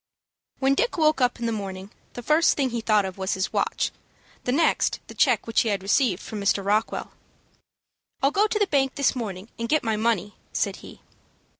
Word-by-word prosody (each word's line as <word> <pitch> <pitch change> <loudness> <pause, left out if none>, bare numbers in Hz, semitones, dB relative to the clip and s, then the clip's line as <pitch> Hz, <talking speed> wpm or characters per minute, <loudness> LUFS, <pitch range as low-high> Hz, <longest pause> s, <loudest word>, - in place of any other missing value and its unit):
When 270 0 +2
Dick 485 - 0
woke 310 -4 +3
up 250 0 +1
in 235 - -3
the 230 - 0
morning 195 -2 -5 0.2
the 245 - -7
first 305 +6 +3
thing 270 -3 +1
he 235 -1 -2
thought 215 -2 +3
of 190 0 -7
was 190 +1 -1
his 190 +1 -2
watch, - - 0 0.5
the 250 - +1
next 320 +5 +2
the - - -11
check - - +2
which 230 - +2
he 230 - 0
had 200 -2 -1
received 200 -1 +1
from 210 -2 -6
Mr. 200 0 +1
Rockwell. 210 +2 0 1.1
"I'll 275 - +4
go 410 +6 +3
to 425 - -1
the 415 - +3
bank 270 -6 +1
this 280 -1 +2
morning, 205 -4 -5
and 230 0 -3
get 310 -1 +2
my 220 -2 0
money," 210 -3 0 0.2
said - - -1
he. - - -13
230 Hz, 205 wpm, -25 LUFS, 200-275 Hz, 1.1 s, I'll